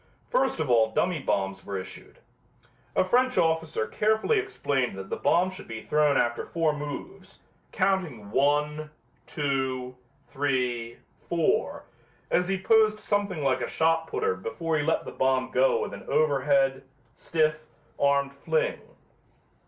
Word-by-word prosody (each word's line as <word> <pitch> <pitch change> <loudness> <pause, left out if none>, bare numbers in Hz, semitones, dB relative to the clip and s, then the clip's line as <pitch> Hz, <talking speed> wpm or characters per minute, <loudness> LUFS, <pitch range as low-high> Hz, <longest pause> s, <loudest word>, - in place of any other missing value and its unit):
First - - +1
of 160 - -1
all 115 -3 +4
dummy 175 +7 0
bombs 95 -6 -2
were 100 - -4
issued. 95 0 -9 0.8
A - - +4
French 250 +6 +2
officer 160 -7 +1
carefully 220 - +1
explained 140 - -1
that 95 0 -8
the - - 0
bomb 180 +2 +2
should 185 +2 -10
be 115 -1 -6
thrown 150 -1 +2
after 120 0 0
four 165 -2 0
moves, 150 +7 -7 0.3
counting 155 - -1
one, 150 +3 +1 0.4
two, 130 -3 -2 0.3
three, 125 -4 -1 0.3
four, 170 -2 0 0.5
as 180 0 +2
he 195 0 -1
posed 215 +1 +4
something 205 -6 -1
like 130 -2 +1
a 120 - -2
shot 165 0 +1
putter 95 - 0
before 155 - -3
he 150 - +1
let 160 +2 0
the - - -6
bomb 130 -1 0
go 130 +1 +3
with - - -6
an - - -9
overhand, 140 -3 +2 0.3
stiff, 155 -1 -1 0.3
armed 140 0 +2
fling. 480 - -1
150 Hz, 140 wpm, -27 LUFS, 130-180 Hz, 0.8 s, all